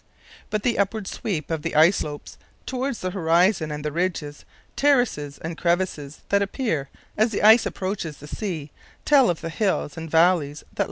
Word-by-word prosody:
But 215 -1 -2
the 240 -4 +1
upward 200 +1 0
sweep 165 -8 -4
of 160 -2 -1
the - - -4
ice 160 +6 +6
slopes 145 -1 -6 0.3
towards 260 -1 -3
the 185 - -2
horizon 175 -1 +2
and 150 0 -5
the 150 - -1
ridges, 160 -3 -3 0.3
terraces, 245 - +1
and 165 +1 -6
crevasses 170 -5 -1
that 200 0 +3
appear 195 - -2 0.3
as 220 +2 +3
the 210 - -3
ice 220 +3 +7
approaches 185 -6 -4
the 150 - -12
sea 155 -3 -5 0.3
tell 280 -4 +5
of 170 - -2
the 165 - -4
hills 185 -5 -1
and 160 0 -6
valleys 160 -3 +3
that - - -25
lie - - -30
below." - - -21
175 Hz, 185 wpm, -24 LUFS, 150-210 Hz, 0.3 s, ice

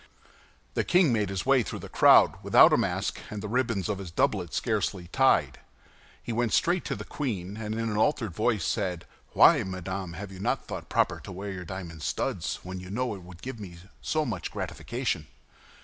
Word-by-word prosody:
The - - +1
king 175 -7 +4
made 105 -4 +1
his 95 -2 -3
way 135 -1 +5
through 105 - -5
the - - -8
crowd - - +6
without - - +7
a - - +5
mask, - - -1
and 105 - -5
the 105 - -5
ribbons 115 -4 0
of 105 -2 -2
his 95 -3 -6
doublet 90 0 0
scarcely 90 -2 -1
tied. 135 +6 +3 0.6
He 120 - -4
went 120 -1 0
straight 175 +1 +2
to - - -2
the - - -7
queen, 100 -9 -4
and 110 -1 -4
in 115 - -2
an 105 -2 -2
altered 110 - +1
voice 105 -1 0
said, 90 -5 -2 0.3
"Why, - - +7
madame, 95 -1 -5
have 95 +3 -7
you 95 - -10
not 100 - -1
thought - - -7
proper - - +1
to - - -10
wear 100 +2 -5
your 90 -2 -6
diamond 85 -3 -7
studs, - - -2
when 90 0 -6
you 90 0 -9
know 120 +3 -1
it 95 - -8
would 90 -1 -13
give 130 -3 -6
me 90 -5 -9 0.2
so 155 -1 0
much 95 -9 -3
gratification?" 115 - -3
100 Hz, 200 wpm, -28 LUFS, 90-115 Hz, 0.6 s, without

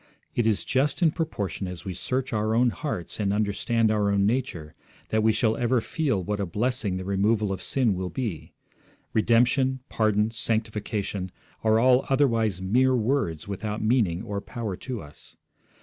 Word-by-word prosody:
It 120 -2 +1
is 105 -3 +1
just 145 +6 +1
in 160 - +5
proportion 105 - -3
as 90 -2 -8
we 95 - -3
search 130 +8 -2
our 110 +1 +1
own 120 +1 +4
hearts 115 - -5
and 100 -2 +1
understand 110 +2 +1
our 105 -2 +2
own 100 -1 +2
nature 105 -10 -2 0.4
that 110 - +2
we 110 +1 +4
shall 110 0 +1
ever 120 +1 +2
feel 130 - -1
what 105 +3 -2
a 100 - 0
blessing 105 0 -1
the 95 - -5
removal 100 +2 +1
of 95 - -4
sin 125 -6 +1
will 90 0 -3
be; 105 - -4 0.6
redemption, 125 +4 +3
pardon, 110 0 +1
sanctification, 105 -4 -2 0.3
are 110 0 +4
all 125 +2 +4
otherwise 115 -8 +2
mere 130 +7 +3
words 110 - 0
without 105 +2 -4
meaning 110 -6 +2
or 100 -3 -4
power 115 -5 -5
to 125 -7 -5
us. 75 0 -12
110 Hz, 165 wpm, -26 LUFS, 100-125 Hz, 0.6 s, in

